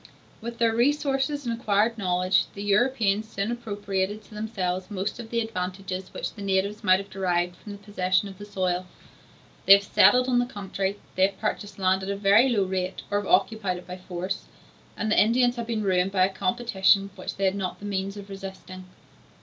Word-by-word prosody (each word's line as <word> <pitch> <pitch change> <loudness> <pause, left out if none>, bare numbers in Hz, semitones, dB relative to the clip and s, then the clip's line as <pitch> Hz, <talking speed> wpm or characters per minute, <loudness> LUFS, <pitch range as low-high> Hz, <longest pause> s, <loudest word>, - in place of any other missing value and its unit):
With 235 +1 -6
their 230 -1 +2
resources 280 +2 +1
and 235 - -1
acquired 215 +2 +2
knowledge, 185 -3 +2
the 200 - -5
Europeans 215 0 +2
soon 200 +2 -2
appropriated 205 -3 -3
to - - -17
themselves 190 -4 -3
most 205 +2 -3
of 230 -2 -8
the 235 0 0
advantages 185 -3 -4
which - - -5
the 205 - -10
natives 200 +2 0
might 185 -2 +5
have 200 +1 -8
derived 180 -2 0
from 205 +3 -10
the - - -8
possession 195 -2 0
of 195 -1 -11
the 205 - -8
soil; 185 -2 -1 0.8
they 195 - +11
have 200 0 +5
settled 250 +5 +5
in 245 -1 +3
the 245 - 0
country, 200 -3 -3 0.2
they 185 +1 +4
have 200 - -11
purchased 205 -2 -3
land 190 0 +2
at 190 - -5
a 200 - -1
very 205 +6 +5
low 215 -5 +2
rate 185 0 -3
or 205 - +2
have 205 - -6
occupied 195 -1 +2
it 180 - -11
by 180 0 -7
force, 180 0 -5 0.5
and 215 0 -1
the - - +5
Indians 245 +3 +3
have 235 -2 -5
been 225 -2 -1
ruined 185 -1 +2
by 185 -2 +4
a 190 - -3
competition 195 -1 +2
which 185 - -6
they 195 - -1
had 190 - +3
not 195 -2 -3
the 205 - -10
means 195 0 -3
of 200 -1 -9
resisting. 190 -1 -9
200 Hz, 205 wpm, -26 LUFS, 190-220 Hz, 0.8 s, they